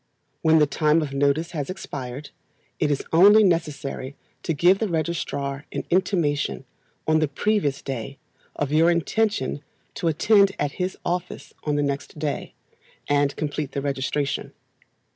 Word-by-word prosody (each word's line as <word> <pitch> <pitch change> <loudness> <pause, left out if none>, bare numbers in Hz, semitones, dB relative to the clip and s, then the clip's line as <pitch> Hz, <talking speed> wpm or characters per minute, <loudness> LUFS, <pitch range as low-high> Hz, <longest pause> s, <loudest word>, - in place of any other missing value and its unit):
When 160 0 +5
the 150 - +5
time 155 +2 +2
of 140 -2 -5
notice 145 +4 +1
has 145 -5 -4
expired, 140 -7 -6 0.5
it 150 - +2
is 145 -2 0
only 205 +6 +8
necessary 145 -6 -1 0.3
to - - -2
give 175 +5 +4
the 220 - 0
registrar 155 -4 -2
an - - -3
intimation, 160 - +1 0.4
on 155 0 +4
the 155 - +2
previous 145 -2 0
day, 135 0 -5 0.4
of 145 -1 -2
your 160 +3 +5
intention 175 -3 0 0.3
to 170 - -2
attend 200 +5 +4
at 145 -1 -1
his 185 +1 -2
office 175 -5 -3
on 150 -1 +1
the 145 - +1
next 140 +2 -3
day, 150 -1 -3 0.5
and 145 -1 +2
complete 150 -2 -3
the 140 - -2
registration. 140 0 -2
150 Hz, 145 wpm, -24 LUFS, 140-170 Hz, 0.5 s, only